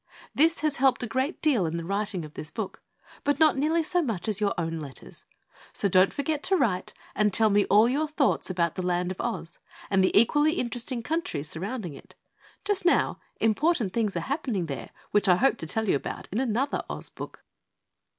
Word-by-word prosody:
This 325 Hz, +3 st, +3 dB
has 305 Hz, -2 st, 0 dB
helped 265 Hz, -1 st, +3 dB
a -, -, -2 dB
great 260 Hz, +8 st, -2 dB
deal 250 Hz, -, +3 dB
in 165 Hz, +1 st, -3 dB
the 170 Hz, -, -5 dB
writing 200 Hz, -2 st, -2 dB
of 150 Hz, -, -12 dB
this 155 Hz, -, -6 dB
book 220 Hz, -1 st, -6 dB, 0.4 s
but 285 Hz, 0 st, +1 dB
not 315 Hz, -2 st, +5 dB
nearly 315 Hz, +4 st, +1 dB
so 355 Hz, +3 st, +1 dB
much 225 Hz, -, -3 dB
as 215 Hz, -1 st, -1 dB
your 205 Hz, -1 st, +1 dB
own 165 Hz, -1 st, -2 dB
letters. 140 Hz, -4 st, -10 dB, 0.5 s
So -, -, 0 dB
don't 185 Hz, 0 st, +4 dB
forget 290 Hz, +1 st, -2 dB
to 385 Hz, -, +3 dB
write 210 Hz, -, 0 dB, 0.2 s
and 210 Hz, -1 st, +2 dB
tell 220 Hz, +2 st, +4 dB
me 205 Hz, 0 st, +4 dB
all 210 Hz, +3 st, +5 dB
your 290 Hz, +5 st, 0 dB
thoughts 295 Hz, -8 st, 0 dB
about 170 Hz, -3 st, 0 dB
the -, -, -4 dB
Land 180 Hz, 0 st, 0 dB
of 185 Hz, -, -5 dB
Oz 220 Hz, -8 st, -4 dB, 0.3 s
and 195 Hz, -1 st, +4 dB
the 185 Hz, -, +3 dB
equally 295 Hz, +7 st, +3 dB
interesting 245 Hz, -4 st, -3 dB
countries 240 Hz, -, -2 dB
surrounding 190 Hz, -, -4 dB
it. -, -, -14 dB, 0.5 s
Just 405 Hz, -2 st, +1 dB
now, 350 Hz, -, +2 dB, 0.2 s
important 225 Hz, -, +1 dB
things 215 Hz, -5 st, 0 dB
are -, -, -1 dB
happening 250 Hz, -, -2 dB
there 140 Hz, -5 st, -6 dB, 0.2 s
which 210 Hz, 0 st, +2 dB
I 180 Hz, -, +7 dB
hope 245 Hz, +5 st, +2 dB
to 160 Hz, -, -5 dB
tell 220 Hz, +6 st, -1 dB
you 165 Hz, -, +3 dB
about -, -, -6 dB
in 210 Hz, -, -1 dB
another 260 Hz, +2 st, 0 dB
Oz -, -, -6 dB
book. -, -, -9 dB
220 Hz, 205 wpm, -27 LUFS, 185-285 Hz, 0.5 s, I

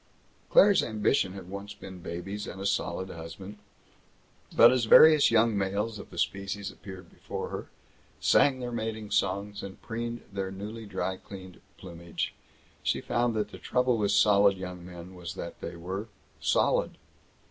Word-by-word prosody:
Claire's 200 Hz, -2 st, +6 dB
ambition 105 Hz, -2 st, +1 dB
had 95 Hz, -2 st, -9 dB
once 100 Hz, +2 st, -7 dB
been 95 Hz, -1 st, -10 dB
babies 95 Hz, +5 st, -5 dB
and 95 Hz, -, -7 dB
a 95 Hz, -, -5 dB
solid 95 Hz, -1 st, -1 dB
husband, 95 Hz, +5 st, -9 dB, 1.0 s
but 115 Hz, -, +8 dB
as 125 Hz, -2 st, +2 dB
various 155 Hz, +5 st, +8 dB
young 115 Hz, -1 st, +3 dB
males 100 Hz, +3 st, -1 dB
of -, -, -10 dB
the -, -, -12 dB
species 100 Hz, 0 st, -2 dB
appeared 95 Hz, -3 st, -11 dB
before -, -, -6 dB
her, -, -, -6 dB, 0.5 s
sang 130 Hz, -2 st, +4 dB
their 125 Hz, -1 st, -4 dB
mating 110 Hz, -2 st, -4 dB
songs 100 Hz, 0 st, 0 dB
and 95 Hz, -1 st, -8 dB
preened 115 Hz, +1 st, -4 dB
their 95 Hz, -1 st, -2 dB
newly 105 Hz, +3 st, -7 dB
dry 95 Hz, -1 st, -2 dB
cleaned 95 Hz, -2 st, -11 dB, 0.2 s
plumage, 85 Hz, -2 st, -5 dB, 0.5 s
she -, -, 0 dB
found 120 Hz, -1 st, 0 dB
that 105 Hz, -1 st, -1 dB
the -, -, -10 dB
trouble 125 Hz, -1 st, +1 dB
with 100 Hz, -1 st, +1 dB
solid 100 Hz, -1 st, +5 dB
young 90 Hz, -1 st, -7 dB
men 90 Hz, 0 st, -10 dB
was 90 Hz, -3 st, -7 dB
that 85 Hz, -, -7 dB
they -, -, -6 dB
were 95 Hz, +5 st, -5 dB, 0.3 s
solid. -, -, +1 dB
100 Hz, 160 wpm, -28 LUFS, 95-110 Hz, 1.0 s, but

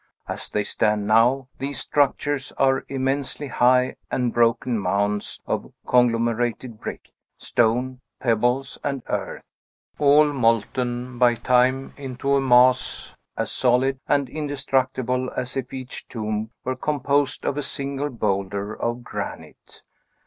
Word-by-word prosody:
As -, -, -3 dB
they 105 Hz, -, 0 dB
stand 105 Hz, 0 st, 0 dB
now, 120 Hz, +5 st, +3 dB
these 135 Hz, 0 st, -3 dB
structures 145 Hz, 0 st, 0 dB
are 135 Hz, 0 st, +2 dB
immensely 135 Hz, +1 st, -2 dB
high 125 Hz, +1 st, +3 dB
and 125 Hz, -2 st, 0 dB
broken 120 Hz, 0 st, +2 dB
mounds 100 Hz, +2 st, -1 dB
of -, -, -3 dB
conglomerated 120 Hz, -1 st, +1 dB
brick, -, -, -7 dB, 0.3 s
stone, 125 Hz, +3 st, 0 dB, 0.2 s
pebbles, 125 Hz, +3 st, 0 dB
and 140 Hz, -3 st, -2 dB
earth, -, -, -3 dB, 0.6 s
all 145 Hz, +1 st, +5 dB
molten 120 Hz, 0 st, 0 dB
by 120 Hz, -1 st, +5 dB
time 130 Hz, +2 st, +2 dB
into 135 Hz, 0 st, -2 dB
a 140 Hz, -, +3 dB
mass 125 Hz, 0 st, +3 dB, 0.2 s
as -, -, -2 dB
solid 130 Hz, +1 st, +2 dB
and 140 Hz, -2 st, +2 dB
indestructible 130 Hz, -3 st, -1 dB
as 125 Hz, 0 st, -2 dB
if 130 Hz, -2 st, -3 dB
each 130 Hz, -1 st, -7 dB
tomb 110 Hz, -1 st, -3 dB
were 130 Hz, +1 st, -2 dB
composed 140 Hz, 0 st, 0 dB
of -, -, 0 dB
a 145 Hz, -, -1 dB
single 140 Hz, +1 st, -2 dB
boulder 100 Hz, -3 st, -2 dB
of 120 Hz, +2 st, -3 dB
granite. -, -, -8 dB
125 Hz, 125 wpm, -23 LUFS, 115-135 Hz, 0.6 s, all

